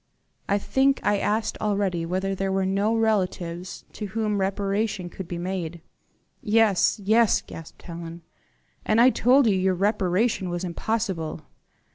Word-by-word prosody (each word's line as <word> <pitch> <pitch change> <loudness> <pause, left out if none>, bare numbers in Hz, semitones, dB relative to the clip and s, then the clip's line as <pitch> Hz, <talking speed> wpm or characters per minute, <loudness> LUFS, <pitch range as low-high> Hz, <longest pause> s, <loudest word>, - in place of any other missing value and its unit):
I 200 - +3
think 270 +6 +2
I 205 -1 +2
asked 215 +2 -1
already 195 -5 0
whether 190 +2 -1
there 195 0 -2
were 190 0 +1
no 200 +4 +1
relatives 185 -5 -1
to 210 - -5
whom 215 0 -1
reparation 195 -1 -1
could 190 - -7
be 175 - -5
made?" 175 -2 -4 0.6
"Yes, 215 -3 +3
yes," 220 +2 +3
gasped 165 -1 -11
Helen; 170 -1 -8 0.6
"and 215 +1 +2
I 250 +2 +7
told 255 +3 +4
you 190 -3 +2
reparation 195 +1 +1
was 175 +1 -3
impossible." 185 -2 -2
195 Hz, 135 wpm, -25 LUFS, 180-215 Hz, 0.6 s, I